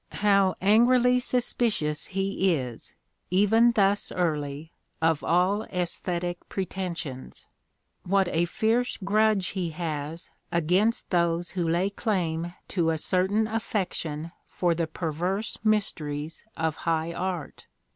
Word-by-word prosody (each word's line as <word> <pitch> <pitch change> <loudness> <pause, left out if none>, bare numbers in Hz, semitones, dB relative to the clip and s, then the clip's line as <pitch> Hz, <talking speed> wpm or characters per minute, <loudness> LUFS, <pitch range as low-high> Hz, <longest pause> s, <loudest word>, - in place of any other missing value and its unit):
How 195 -2 +4
angrily 245 +5 +5
suspicious 235 - +1
he 195 -1 +1
is, 125 -5 -6 0.3
even 215 +6 +4
thus 200 -1 +2
j - - -8
early, 150 -3 -2 0.3
of 160 -2 +1
all 180 +5 +2
aesthetic 175 -1 -3
pretensions! 175 -8 -5 0.6
What 195 0 +2
a 170 +1 +1
fierce 225 +7 0
grudge 210 0 +2
1 190 - -1
he 170 - -2
has 160 0 -5 0.2
against 185 +8 +1
those 170 -1 +1
who 175 -3 -1
lay 180 +4 +1
claim 175 -5 -2
to 170 -4 +1
a 160 - +1
certain 190 +6 +1
affection 180 -8 -3
\ - - -45
for 175 -2 +3
the 165 0 -1
perverse 180 +7 -3
mysteries 160 -8 -1
of 160 -2 -1
high 165 0 -1
art! 180 -4 -4
180 Hz, 125 wpm, -27 LUFS, 165-200 Hz, 0.6 s, angrily